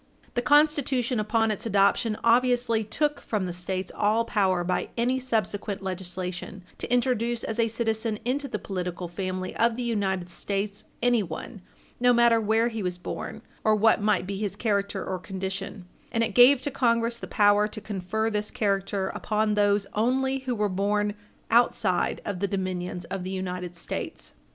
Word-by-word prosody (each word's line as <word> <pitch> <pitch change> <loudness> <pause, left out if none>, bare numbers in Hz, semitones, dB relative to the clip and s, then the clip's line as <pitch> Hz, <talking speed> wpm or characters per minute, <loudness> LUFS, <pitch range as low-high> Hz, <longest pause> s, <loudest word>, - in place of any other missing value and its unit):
The 245 - 0
Constitution 280 -4 +3
upon 225 +1 +1
its 210 +2 -3
adoption 210 +2 +2
obviously 240 -1 +3
took 295 +7 -1
from 210 -4 -2
the 175 - -4
States 185 +1 -3
all 215 +3 +2
power 190 -6 +1
by 180 +1 -1
any 250 +3 +1
subsequent 210 -5 -2
legislation 185 0 -5 0.2
to - - -5
introduce 240 -2 +1
as 225 +1 -3
a 230 - +4
citizen 225 -1 -1
into 275 +3 -1
the 250 - -3
political 180 -2 -4
family 185 +1 -4
of 230 0 +3
the 250 - -3
United 190 -6 -1
States 200 +2 -3 0.2
anyone, 215 -3 0 0.4
no 245 0 +5
matter 235 -1 +5
where 225 +2 +2
he 225 -2 -4
was 180 -2 -2
born 180 - -6 0.2
or 215 0 +4
what 215 0 +4
might 210 -3 +2
be 195 +1 -4
his 200 -1 -2
character 200 -2 -1
or 185 -1 -3
condition, 190 0 -5 0.3
and 230 -2 +1
it 225 -2 -1
gave 250 +3 +7
to 285 - -2
Congress 235 -2 +1
the - - -7
power 205 -1 +4
to 215 - -7
confer 215 +2 -2
this 210 0 -1
character 195 -2 0
upon 215 0 0
those 205 -1 +3
only 265 +4 +1
who 260 -2 -3
were 210 -1 +1
born 205 +2 0 0.4
outside 240 +1 +2
of 200 -3 -3
the 200 - 0
dominions 185 -2 -3
of 195 0 -4
the 185 - -4
United 180 -2 -4
States. 170 - -5
210 Hz, 170 wpm, -26 LUFS, 190-235 Hz, 0.4 s, gave